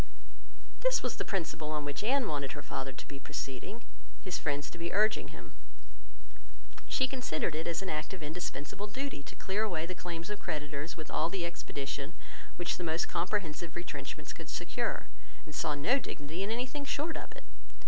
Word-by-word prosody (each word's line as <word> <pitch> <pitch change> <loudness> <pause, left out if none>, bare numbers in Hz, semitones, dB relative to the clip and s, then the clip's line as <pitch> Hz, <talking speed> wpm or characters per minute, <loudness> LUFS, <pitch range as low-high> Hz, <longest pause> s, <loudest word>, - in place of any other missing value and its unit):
This - - +5
was - - +1
the - - +1
principle 165 -5 0
on 150 -1 +1
which 145 +6 -1
Anne 255 +1 +5
wanted 140 -3 0
her - - -5
father 135 -1 -1
to 130 - -7
be 140 - -5
proceeding, 135 - -3 0.4
his 185 -2 0
friends 145 -1 +1
to 170 - -7
be 170 0 0
urging 215 +3 +5
him. - - -9 1.3
She 260 - +5
considered 250 - +1
it 160 +2 0
as 170 +2 +1
an 190 - -1
act 155 0 0
of 185 -4 -4
indispensable 160 +4 -2
duty 265 - -2
to - - -8
clear 195 +2 +1
away 175 -7 +2
the 185 - -2
claims 175 +1 -3
of 210 - -1
creditors 150 -1 -2
with 155 - -5
all 165 - +4
the 180 -2 0
expedition 140 -2 -2 0.4
which 175 -1 +1
the 180 - -2
most 160 0 +3
comprehensive 170 -3 +1
retrenchments 145 -6 -3
could - - -7
secure, - - 0 0.4
and 155 - -8
saw 150 +1 +2
no 235 - +5
dignity 155 - -3
in 200 - +2
anything 255 +5 0
short 300 +3 +1
of - - -4
it. - - -9
170 Hz, 185 wpm, -34 LUFS, 150-205 Hz, 1.3 s, This